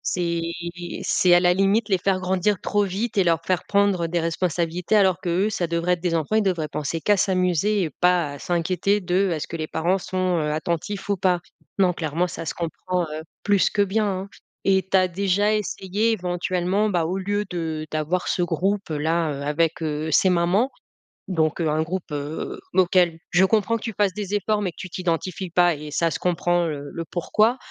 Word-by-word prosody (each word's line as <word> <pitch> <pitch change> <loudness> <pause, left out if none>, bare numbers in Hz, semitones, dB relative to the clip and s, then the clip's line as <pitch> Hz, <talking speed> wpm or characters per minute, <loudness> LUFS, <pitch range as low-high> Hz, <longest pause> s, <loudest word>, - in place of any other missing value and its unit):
C'est 170 -2 -1 0.6
c'est 180 -1 +3
à 175 - +7
la 180 0 +4
limite 200 +3 +2
les 190 - +3
faire 185 +1 0
grandir 190 +2 +1
trop 205 0 +1
vite 205 +4 -3
et 195 - +5
leur 165 -2 +2
faire 185 -1 0
prendre 200 -4 +2
des 170 +1 -1
responsabilités 170 +2 -1
alors 190 -3 +4
qu'eux, 185 +3 +1
ça 200 -5 -1
devrait 170 +2 +1
être 175 - -3
des 175 -2 0
enfants, 165 +6 0
ils 220 - +4
devraient 175 -5 0
penser 150 +2 -3
qu'à 205 +3 +3
s'amuser 185 +2 +1
et 165 - -2
pas 175 0 +1
à 145 - -9
s'inquiéter 180 +4 0
de: 185 +1 +1
«Est-ce 155 -3 -3
que 165 - -5
les 155 - -3
parents 170 +5 0
sont, 185 -1 -1
heu, 150 -1 -1
attentifs 170 +6 -3
ou 200 - +1
pas?» 180 -1 +2 0.4
Non, 180 -2 +4
clairement 165 +2 -1
ça 165 - -6
se - - -3
comprend, 180 +2 -3
heu, 155 +1 -5 0.2
plus 205 -2 +3
que 205 - +1
bien, 210 +2 +1
hein! 190 0 -3 0.4
Et 190 -1 +2
tu - - +1
as 185 -1 +4
déjà 200 +3 +1
essayé 210 +1 -1
éventuellement, 180 +1 0
bah, 175 -4 +1
au 180 +4 -2
lieu 205 +2 -1
de, 160 -3 -3
d'avoir 155 +4 -1
ce 180 - +1
groupe-là, 165 -3 0
heu, 140 - -6
avec, 165 +3 0
heu, 155 0 -2
ces 185 - +4
mamans? 180 +8 +2 0.6
Donc 160 -3 0
heu, 160 - +1
un 155 +1 +1
groupe, 175 +1 -5
heu, 145 +1 -4
auquel 175 -2 +3
je 180 +2 +4
comprends 220 +3 +2
que 225 - -12
tu 225 -2 -4
fasses 205 -2 +2
des 205 0 -5
efforts 210 +1 0
mais 185 - -1
que - - -33
tu 185 - -6
t'identifies 180 +1 -3
pas 175 -1 +4
et 150 +1 -8
ça 165 +3 +1
se - - -2
comprend, 175 0 +1
heu, 145 -2 -5
le 165 -1 -5
«pourquoi?» 215 +7 +2
180 Hz, 205 wpm, -23 LUFS, 165-195 Hz, 0.6 s, à